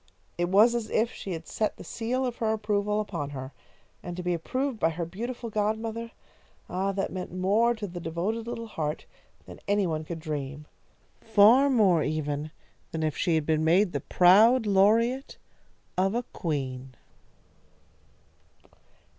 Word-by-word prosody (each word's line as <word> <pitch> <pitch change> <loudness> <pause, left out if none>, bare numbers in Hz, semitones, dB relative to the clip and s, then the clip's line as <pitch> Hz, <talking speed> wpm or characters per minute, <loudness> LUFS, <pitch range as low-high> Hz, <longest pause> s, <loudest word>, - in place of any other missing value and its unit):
It 175 0 -1
was 215 +5 +6
as 235 -2 -2
if 230 +2 +1
she 190 - -6
had 165 -1 -6
set 215 - -2
the - - -9
seal 250 +3 -2
of 245 -2 -3
her 220 -1 0
approval 210 -1 0
upon 170 -9 -4
her, 130 +1 -7 0.5
and 175 0 -7
to 180 - -4
be 180 0 0
approved 255 - -2
by 165 - +3
her 170 +1 -4
beautiful 230 +6 -6
godmother, 220 +2 -2 0.6
ah, 190 +2 -1
that 195 0 -2
meant 185 -1 -5
more 205 +6 +2
to 220 -2 -5
the 175 -2 -7
devoted 185 +8 -3
little 235 -1 -5
heart 155 -8 -4 0.4
than - - -11
any 205 0 +2
one 160 -2 -2
could 165 +1 -6
dream; 150 -2 -5 0.5
far 225 +6 +5
more, 200 - +4
even, 150 -1 -2 0.4
than 160 -1 -3
if 155 -1 -1
she 170 -4 +1
had 155 -2 0
been 155 0 +1
made 180 +4 +3
the - - -2
proud 220 +7 +5
laureate 225 +7 +2 0.6
of 195 +3 +2
a 240 - 0
queen. 135 -5 -4
195 Hz, 160 wpm, -27 LUFS, 165-225 Hz, 0.6 s, was